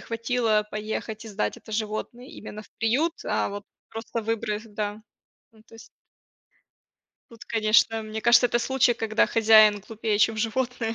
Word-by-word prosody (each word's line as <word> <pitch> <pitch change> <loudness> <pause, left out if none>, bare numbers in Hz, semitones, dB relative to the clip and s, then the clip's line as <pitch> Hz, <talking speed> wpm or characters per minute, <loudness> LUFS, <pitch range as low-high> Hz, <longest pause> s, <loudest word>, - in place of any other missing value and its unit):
хватило 230 -2 0
поехать, 215 +1 -5
и - - -9
сдать 210 0 -3
это 220 - -13
животное 215 +3 -4
именно 215 -4 -10
в - - -21
приют, 265 +9 +1
а - - -1
вот 205 0 -7 0.3
просто 225 0 -5
выбрас 220 -1 -2
да 210 -1 -5 0.5
ну 220 -1 -21
то 225 - -20
есть. 225 - -14 1.4
Тут, 230 -1 -13
конечно, 225 0 +2
мне 215 0 -6
кажется, 240 +2 +5
это 240 - 0
случай, 260 0 +2
когда 225 -2 +1
хозяин 215 -2 +5
глупее, 220 -1 -2
чем 220 +1 +3
животное. 230 +1 -2
225 Hz, 155 wpm, -25 LUFS, 215-230 Hz, 1.4 s, кажется